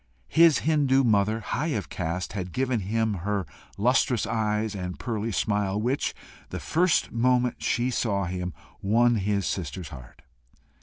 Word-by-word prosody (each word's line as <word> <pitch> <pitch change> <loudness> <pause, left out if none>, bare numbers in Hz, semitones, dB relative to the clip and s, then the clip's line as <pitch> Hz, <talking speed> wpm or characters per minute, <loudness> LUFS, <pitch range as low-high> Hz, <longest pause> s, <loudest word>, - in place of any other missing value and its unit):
His 165 -2 +5
Hindoo 140 -3 +3
mother, 110 -1 +2
high 145 +4 -1
of 100 - -5
caste, 90 +1 -3
had 90 -3 -5
given 130 -2 0
him 110 +2 0
her 100 0 -1 0.3
lustrous 125 +2 +2
eyes 110 -1 -1
and 90 -2 -5
pearly 115 -2 -3
smile, 105 -1 0
which, 125 +6 -1 0.3
the - - -5
first 175 0 +1
moment 125 +1 +1
she 120 +2 0
saw 100 -5 0
him, 90 0 -3 0.3
won 115 +4 +3
his 100 -1 0
sister's 85 -1 -4
heart. 65 -5 -12
110 Hz, 145 wpm, -26 LUFS, 95-125 Hz, 0.3 s, His